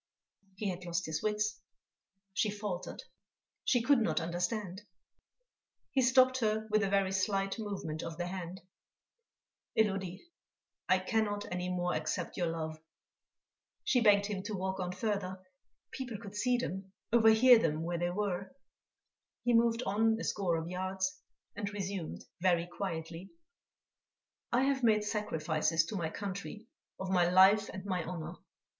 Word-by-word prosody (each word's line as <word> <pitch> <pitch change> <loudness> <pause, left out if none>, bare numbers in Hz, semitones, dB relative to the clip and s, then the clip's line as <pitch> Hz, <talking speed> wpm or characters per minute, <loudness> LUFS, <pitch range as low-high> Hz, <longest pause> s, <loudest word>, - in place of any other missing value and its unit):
He 200 +1 -2
had 180 0 -7
lost 170 -1 -1
his 160 -1 -2
wits, 210 0 0 0.7
she 210 - +1
faltered, 205 -3 -5 0.6
she 245 -3 +2
could 275 +1 +5
not 220 - +1
understand.... 180 +3 -2 1.1
He 270 - +3
stopped 255 0 +5
her 220 -1 0
with 215 0 +4
a 200 - +1
very 195 -1 +2
slight 195 +2 0
movement 195 -7 -4
of 165 -1 -6
the 175 - -2
hand: 180 0 -6 1.2
"Élodie, 195 -4 +1 0.7
I 185 - +6
cannot 205 +1 0
any 180 0 -2
more 180 -1 0
accept 160 +3 -2
your 175 - 0
love." 160 -1 -4 1.0
She 250 - +3
begged 205 -2 +5
him 200 -2 -3
to 215 -1 -3
walk 190 0 -2
on 180 -1 -2
further; 190 -1 -2 0.5
people 245 -5 -5
could 200 -2 -10
see 250 +4 +2
them, 195 -5 -4 0.2
overhear 230 +1 +7
them, 160 -4 0
where 170 0 -2
they 175 0 0
were. 195 +2 -2 0.9
He 240 0 +2
moved 230 +1 +3
on 225 +2 +2
a - - -4
score 180 -5 0
of 160 0 -4
yards, 190 - -2 0.3
and 205 -2 -3
resumed, 195 -4 -4 0.2
very 175 -2 +3
quietly: 175 -1 -5 1.2
"I 245 +2 +3
have 270 -1 +1
made 215 -3 +4
sacrifices 160 -6 0
to 190 - -5
my 170 -4 -1
country 200 +4 -6 0.3
of 190 0 -3
my 175 -2 +4
life 195 +3 +6
and 190 +1 -7
my 185 -3 -1
honour. 165 -1 -5
195 Hz, 145 wpm, -32 LUFS, 175-215 Hz, 1.2 s, overhear